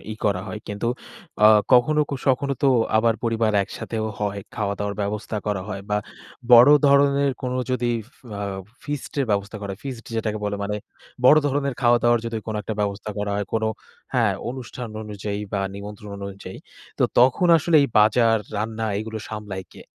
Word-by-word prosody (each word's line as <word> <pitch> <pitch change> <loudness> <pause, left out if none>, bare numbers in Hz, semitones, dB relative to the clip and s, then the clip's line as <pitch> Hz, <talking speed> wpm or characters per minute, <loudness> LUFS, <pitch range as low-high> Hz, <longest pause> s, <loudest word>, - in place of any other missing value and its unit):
ই - - -6
করা 100 -3 +1
হয়। 105 - -5
কিন্তু 105 +3 -3 0.6
আ - - +10 0.3
কখনো 150 +5 +5
কো 140 - -1
সখনো 140 +1 +2
তো 140 - +5 0.3
আবার 115 0 +3
পরিবার 115 -1 +1
একসাথেও 110 +2 -5 0.2
হয়, 100 -1 -2
খাওয়া 100 -2 -1
দাওয়ার 105 0 -2
ব্যবস্থা 105 +2 -3
করা 105 -3 -1
হয় 100 -2 -4
বা 105 - +2 0.6
বড় 120 +4 +10 0.2
ধরনের 140 0 +4
কোন 125 -1 -2 0.2
যদি 120 -3 0 0.3
আ - - -4 0.4
ফিস্টের 145 -1 -3
ব্যবস্থা 100 +1 -1
করা 100 -1 -5
হয়, 95 - -10
ফিস্ট 125 -4 -6
যেটাকে 110 -1 -1
বলে 100 0 -1
মানে 105 +1 -2 0.5
বড় 150 +4 +8
ধরনের 140 -1 0
খাওয়াদাওয়ার 120 -1 +4
যদি 115 -1 -3
কোনো 110 -1 -3
একটা 110 - -4
ব্যবস্থা 100 +1 -2
করা 105 0 -2
হয়, 105 -1 -2
কোন 110 0 0 0.5
হ্যাঁ, - - +3 0.2
অনুষ্ঠান 125 -1 -7
অনুযায়ী 105 -1 -5
বা 100 - 0
নিমন্ত্রণ 105 +1 -8 0.2
অনুযায়ী। 100 0 -9 0.4
তো - - +4
তখন 130 +8 +4
আসলে 160 +1 +2
এই 140 - +1
বাজার, 115 +1 +4 0.2
রান্না 110 +1 -2
এগুলো 110 0 -5
সামলায় 105 -3 -6
কে? - - -12
110 Hz, 170 wpm, -23 LUFS, 105-125 Hz, 0.6 s, আ